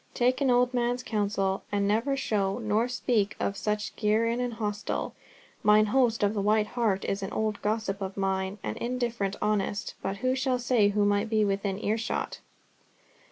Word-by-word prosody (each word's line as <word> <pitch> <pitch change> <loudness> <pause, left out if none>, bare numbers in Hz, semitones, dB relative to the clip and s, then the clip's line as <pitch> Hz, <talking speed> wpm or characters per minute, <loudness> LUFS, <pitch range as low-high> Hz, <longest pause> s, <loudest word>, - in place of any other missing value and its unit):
Take 250 +3 +2
an 275 - +3
old 245 0 +3
man's 245 0 0
counsel, 200 -3 0
and 200 -1 +1
never 230 +7 +1
show, 200 -7 0
nor 220 0 +1
speak 240 -4 0
of 200 - -1
such 210 +1 -2
gear 215 +1 +2
in 235 +1 0
an 245 -1 -1
hostel. 210 -2 -3 0.5
Mine 210 0 +5
host 230 0 +2
of 205 +1 +2
the 205 - -1
White 210 +1 +3
Hart 220 -6 0
is 195 +1 -2
an 195 - -4
old 215 -1 -1
gossip 210 -2 -1
of 190 0 -4
mine, 190 0 -1
and 105 0 -3
indifferent 235 -5 -2
honest, 205 -1 -1
but 195 +1 -3
who 255 +5 +1
shall 260 -1 +1
say 240 -4 +3
who 205 0 +2
might 205 +2 +1
be 215 -1 +3
within 195 -1 -1
earshot?" 220 +2 -2
215 Hz, 180 wpm, -28 LUFS, 200-240 Hz, 0.5 s, Mine